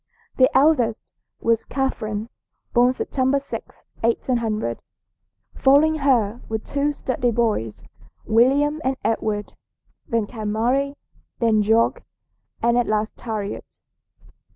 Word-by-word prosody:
The 260 -1 +6
eldest 260 -6 +2 0.3
was 230 -1 +2
Catherine, 225 -5 -3 0.4
born 245 +1 +5
September 265 +1 0
6, 280 - -9 0.2
1800. 225 - -1 0.7
Following 295 +4 +4
her 240 -5 +2
were 220 - 0
two 280 +6 -1
sturdy 255 -3 -1
boys, 215 - -1 0.4
William 275 +7 +3
and 265 0 0
Edward; 215 -2 -1 0.5
then 230 -2 0
came 215 -2 -4
Mary, 270 +6 +1 0.4
then 225 -2 +3
George, 220 +2 +3 0.7
and 235 +1 +3
at 240 - 0
last 215 0 -2
Harriet. 215 -3 -5
235 Hz, 105 wpm, -22 LUFS, 220-270 Hz, 0.7 s, The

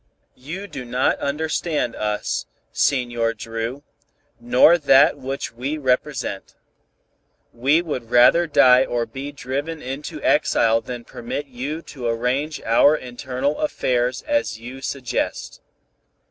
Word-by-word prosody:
"You 170 +9 -6
do 135 -10 -7
not 125 +1 0
understand 150 -2 -1
us, 105 0 -2 0.2
Senor 120 -3 0
Dru, 115 +5 -5 0.6
nor 125 +8 +5
that 140 -1 +5
which 135 +1 -4
we 135 +6 -3
represent. 130 -6 -2 1.0
We 140 +8 +2
would 130 -8 -5
rather 145 +9 +5
die 130 -4 +6
or 120 -2 -1
be 135 +5 -7
driven 145 +4 -4
into 135 +2 -6
exile 115 0 +3
than 120 -1 -7
permit 120 +5 -5
you 140 +5 -5
to 125 -5 -6
arrange 125 +6 -1
our 130 +6 +5
internal 130 +2 -3
affairs 125 -4 0
as 290 - -1
you 125 +3 -9
suggest. 135 -2 -3
130 Hz, 120 wpm, -22 LUFS, 120-145 Hz, 1.0 s, die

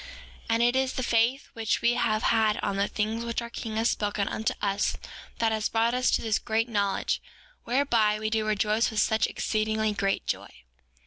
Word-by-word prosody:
5:4 - - -12 0.4
And 230 +1 +3
it 240 +1 +3
is 265 0 +1
the 255 - -2
faith 235 +3 +1
which 225 -2 -1
we 235 - +4
have 220 -2 0
had 220 -2 +3
on 195 - -1
the 200 +1 +1
things 220 +2 -2
which 235 0 -2
our 235 0 -6
king 220 -2 -5
has 225 +1 +2
spoken 205 -1 -1
unto 220 - -2
us 200 0 0 0.4
that 225 -1 +1
has 215 -1 0
brought 230 +1 +1
us 250 0 +2
to - - +1
this 220 -1 +1
great 225 +1 0
knowledge, 200 -4 0 0.4
whereby 235 -5 +2
we 215 0 -3
do 220 -1 +1
rejoice 215 +2 +1
with 220 -2 -2
such 220 +1 +2
exceedingly 215 0 -1
great 195 -1 -1
joy. - - -3
220 Hz, 200 wpm, -27 LUFS, 215-235 Hz, 0.4 s, we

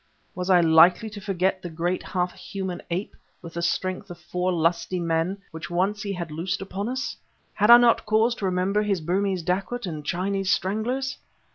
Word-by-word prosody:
Was 180 +1 -4
I 180 -2 +6
likely 170 +6 +5
to 205 -1 -8
forget 190 -1 0
the 175 - -6
great 175 +3 -2
half 180 -1 -2
human 190 -3 -5
ape, 180 +4 -3 0.3
with 165 -1 -9
the 170 - -3
strength 185 +2 -1
of 175 - -8
four 180 +2 -2
lusty 170 +1 0
men, 170 +3 0
which 160 +1 -7
once 190 +4 0
he 200 - -3
had 175 -4 -5
loosed 180 +5 -2
upon 195 +3 -4
us? 260 +2 -3 0.4
had 210 +1 +2
I 240 - +12
not 240 -2 +3
cause 220 +3 +3
to 200 - -3
remember 185 +3 +1
his 205 -3 0
Burmese 185 +2 -1
dacoits 195 +7 -2
and 155 -4 -5
Chinese 190 +4 -1
stranglers? 240 +8 -1
185 Hz, 185 wpm, -25 LUFS, 175-200 Hz, 0.4 s, I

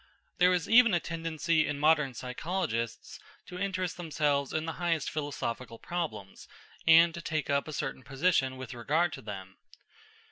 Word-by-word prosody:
There 180 0 +6
is 180 -2 0
even 230 -4 +6
a - - +2
tendency 165 -1 0
in 145 - -2
modern 150 -3 +3
psychologists 125 -2 -3 0.3
to 180 - -8
interest 185 -2 -2
themselves 150 -5 0
in 155 0 -1
the 165 - -2
highest 165 -4 0
philosophical 125 -6 -4
problems, 110 - -5 0.4
and 165 +1 +7
to 170 - -6
take 155 -3 -2
up 140 +1 +1
a - - -5
certain 135 -3 -3
position 135 -1 +1
with 130 0 -7
regard 155 +8 0
to - - -7
them. 95 -3 -8
155 Hz, 155 wpm, -30 LUFS, 130-170 Hz, 0.4 s, and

